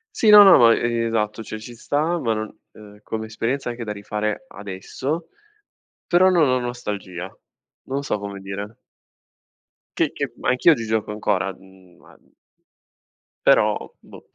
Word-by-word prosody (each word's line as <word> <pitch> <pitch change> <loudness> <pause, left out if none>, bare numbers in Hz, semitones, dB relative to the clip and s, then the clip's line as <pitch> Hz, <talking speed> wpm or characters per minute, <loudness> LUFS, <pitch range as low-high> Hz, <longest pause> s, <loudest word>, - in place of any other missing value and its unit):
Sì, 220 - +3
no, 210 0 +11
no, 195 - +8
ma 115 -1 +6
esatto, 115 -2 -1
cioè 110 +1 -7
ci 120 +2 -10
sta, 155 +8 -1
ma 115 -5 0
non 110 0 -5
ehm, 105 -1 -15
come 110 0 -5
esperienza 120 +4 -3
anche 120 0 -5
da 105 - -5
rifare 105 - -4
adesso, 105 - -5 0.8
però 185 +2 +4
non 170 -6 +4
ho 130 0 +2
nostalgia. 100 -7 -6 0.5
Non 140 +2 -3
so 105 - -2
come 100 -1 -7
dire. 100 +3 -7 1.2
Che - - +1
che - - -4
anch'io 130 +6 +4
oggi 115 -4 -4
gioco 110 -1 -1
ancora, 95 -2 -1
mhmm, 95 -1 -20
ma - - -20 1.3
però, - - +4 0.2
boh. - - -15
110 Hz, 145 wpm, -22 LUFS, 105-130 Hz, 1.3 s, no